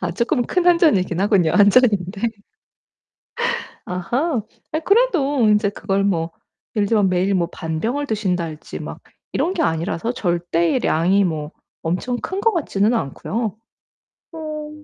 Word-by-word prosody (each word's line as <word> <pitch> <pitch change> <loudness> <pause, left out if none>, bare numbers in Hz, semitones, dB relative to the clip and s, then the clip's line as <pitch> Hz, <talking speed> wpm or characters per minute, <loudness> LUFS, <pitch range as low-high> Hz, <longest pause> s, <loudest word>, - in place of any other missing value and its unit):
아 175 -1 -1
쪼끔 245 - +1
큰 360 -1 0
1 350 -1 +6
잔이기는 190 - +2
하군요, 195 -6 +3
1 205 -1 +6
잔인데. 205 -2 +2 1.6
아하. 240 - -1 0.3
아 310 - +1
그래도 345 - +2
인제 210 -1 +3
그걸 195 0 -1
뭐 170 -4 0 0.5
예를 205 -1 +2
들면 210 -4 +3
매일 185 +2 +1
뭐 170 -2 +1
반 160 -3 -4
병을 285 +6 -1
드신달지 180 - -3
막 - - -7 0.3
이런 360 - 0
게 335 - 0
아니라서 165 - -1
절대의 175 +1 0
양이 185 +5 +3
뭐 155 -3 -2 0.3
엄청 185 +9 -1
큰 380 +1 -3
것 455 +1 +3
같지는 235 - +1
않고요. 220 - -2 0.8
어 305 -2 -6
205 Hz, 260 characters per minute, -21 LUFS, 175-275 Hz, 1.6 s, 1